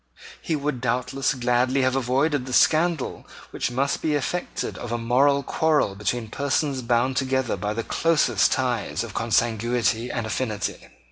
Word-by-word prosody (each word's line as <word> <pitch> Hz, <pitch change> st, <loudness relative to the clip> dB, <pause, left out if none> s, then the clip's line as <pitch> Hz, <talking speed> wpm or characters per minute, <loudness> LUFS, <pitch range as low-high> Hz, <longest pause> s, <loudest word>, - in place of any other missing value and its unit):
He 160 Hz, -, -1 dB
would 140 Hz, -4 st, -3 dB
doubtless 125 Hz, +3 st, 0 dB
gladly 125 Hz, +2 st, +1 dB
have 130 Hz, 0 st, +1 dB
avoided 135 Hz, +2 st, 0 dB
the 130 Hz, -, -5 dB
scandal 160 Hz, +1 st, +2 dB, 0.2 s
which -, -, -2 dB
must 135 Hz, +3 st, -1 dB
be 155 Hz, -, 0 dB
the -, -, +2 dB
effect 175 Hz, +5 st, -2 dB
of 120 Hz, -, -6 dB
a 120 Hz, -, 0 dB
mortal 135 Hz, +5 st, +2 dB
quarrel 150 Hz, -8 st, +1 dB
between 110 Hz, +3 st, -2 dB
persons 140 Hz, +2 st, -1 dB
bound 120 Hz, +2 st, +1 dB
together 130 Hz, -2 st, 0 dB
by 105 Hz, 0 st, -3 dB
the 115 Hz, -, -2 dB
closest 165 Hz, +4 st, +2 dB
ties 125 Hz, -5 st, -1 dB
of 115 Hz, -4 st, -8 dB
consanguinity 115 Hz, +1 st, 0 dB
and 115 Hz, -2 st, -3 dB
affinity. 110 Hz, -1 st, -3 dB
130 Hz, 155 wpm, -24 LUFS, 120-140 Hz, 0.2 s, scandal